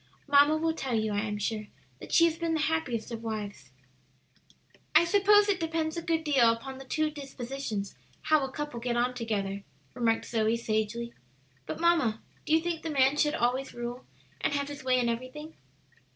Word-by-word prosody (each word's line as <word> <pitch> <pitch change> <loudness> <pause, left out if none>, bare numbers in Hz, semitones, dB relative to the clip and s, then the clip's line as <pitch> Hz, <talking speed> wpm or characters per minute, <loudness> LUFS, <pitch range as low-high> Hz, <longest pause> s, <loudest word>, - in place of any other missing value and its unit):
Mamma 290 +2 +5
will 325 +1 0
tell 265 -6 -2
you, 215 -1 0
I 205 - +1
am 210 -1 -2
sure, 210 +1 -3 0.3
that - - -10
she 335 - +6
has 330 -1 +1
been 330 -1 -1
the 315 - 0
happiest 295 -8 -1
of 230 -1 -5
wives." 205 - -5 1.3
"I - - +7
suppose 410 +3 +5
it 395 -3 +1
depends 325 -1 -1
a 340 - -3
good 325 -1 0
deal 265 -7 +4
upon 265 +3 -6
the 270 - -10
two 310 +3 0
dispositions 270 -7 -5 0.3
how 310 -2 +3
a 265 - -4
couple 295 -4 -5
get 240 0 -1
on 245 +1 +1
together," 205 -5 -2 0.3
remarked 230 -2 +1
Zoe, 225 0 +1
sagely. 230 +1 -2 0.5
"But, - - -4
mamma, 330 -11 +3 0.3
do 310 - +2
you 320 - +5
think 335 -1 -2
the 325 - -4
man 270 -1 +3
should 295 0 +2
always 255 +3 0
rule 240 +1 -5 0.4
and - - 0
have 280 0 -1
his 285 -2 -8
way 255 -1 +3
in 240 - +1
everything?" 255 +7 -5
265 Hz, 190 wpm, -29 LUFS, 230-315 Hz, 1.3 s, I